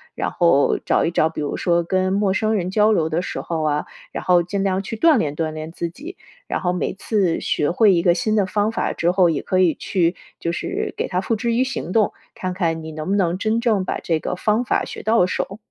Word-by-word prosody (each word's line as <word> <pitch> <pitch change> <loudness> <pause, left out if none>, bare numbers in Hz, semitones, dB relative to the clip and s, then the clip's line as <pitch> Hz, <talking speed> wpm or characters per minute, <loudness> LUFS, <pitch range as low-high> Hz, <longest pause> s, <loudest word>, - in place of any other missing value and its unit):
然 - - -1
后 170 -5 +3
找 - - +2
一 - - +1
找 165 -2 +2
比 160 - -5
如 145 - -3
说 170 -1 +1
跟 185 +2 0
陌 200 -1 +2
生 220 0 +1
人 185 -4 -1
交 210 +2 +3
流 165 -7 +1
的 165 +3 -1
时 - - -4
候 165 -2 -3
啊， 150 -1 0 0.3
然 - - -5
后 175 -1 +4
尽 195 +3 -3
量 195 0 0
去 225 - -5
锻 315 +5 +4
炼 150 -9 -1
锻 160 0 -1
炼 155 +1 -7
自 170 0 -4
己。 300 - -10 0.3
然 - - -2
后 180 - +1
每 180 - -2
次 195 -3 0
学 150 - 0
会 210 +3 +5
一 170 - +1
个 175 -2 +5
新 215 +3 0
的 205 -3 +3
方 205 +3 0
法 225 - -1
之 170 - 0
后， 180 -2 +4
也 150 - -2
可 185 - -1
以 180 -3 +4
去 175 +2 0 0.2
就 170 - -2
是 390 - -3
给 - - -1
它 180 - -1
付 210 +4 -1
之 235 +2 -1
于 245 +3 +3
行 255 -9 -4
动， 215 0 +2 0.2
看 185 -1 -3
看 165 -3 -1
你 160 - -7
能 155 +2 -5
不 200 - +2
能 180 -2 +1
真 220 +2 +1
正 220 -5 +1
把 - - -2
这 165 -2 -1
个 180 - -3
方 215 +5 +1
法 240 - 0
学 - - -8
到 220 -3 +3
手。 195 +2 -3
185 Hz, 275 characters per minute, -21 LUFS, 170-215 Hz, 0.3 s, 会